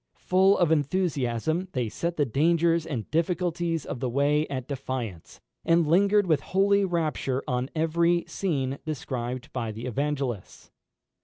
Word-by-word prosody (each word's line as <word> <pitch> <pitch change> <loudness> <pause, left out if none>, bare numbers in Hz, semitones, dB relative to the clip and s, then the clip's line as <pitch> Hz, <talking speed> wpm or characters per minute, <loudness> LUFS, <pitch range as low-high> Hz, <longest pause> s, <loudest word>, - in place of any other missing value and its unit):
Full 190 +2 +3
of 175 -3 +2
enthusiasm, 155 0 0
they 125 -3 -1
set 170 +10 -3
the 145 - +3
dangers 165 +5 +2
and 125 -8 -5
difficulties 170 0 0
of 125 - -5
the 130 0 -1
way 145 +4 +2
at 130 -2 -5
defiance, 130 - -5 0.2
and 165 0 +3
lingered 200 +6 +4
with 155 -5 +2
holy 200 +3 +2
rapture 155 -7 -1
on 125 +1 -1
every 170 +2 +2
scene 140 -8 -2
described 130 -3 -4
by 115 -3 -2
the 110 +3 -7
Evangelists. 135 -4 -3
150 Hz, 140 wpm, -26 LUFS, 130-170 Hz, 0.2 s, lingered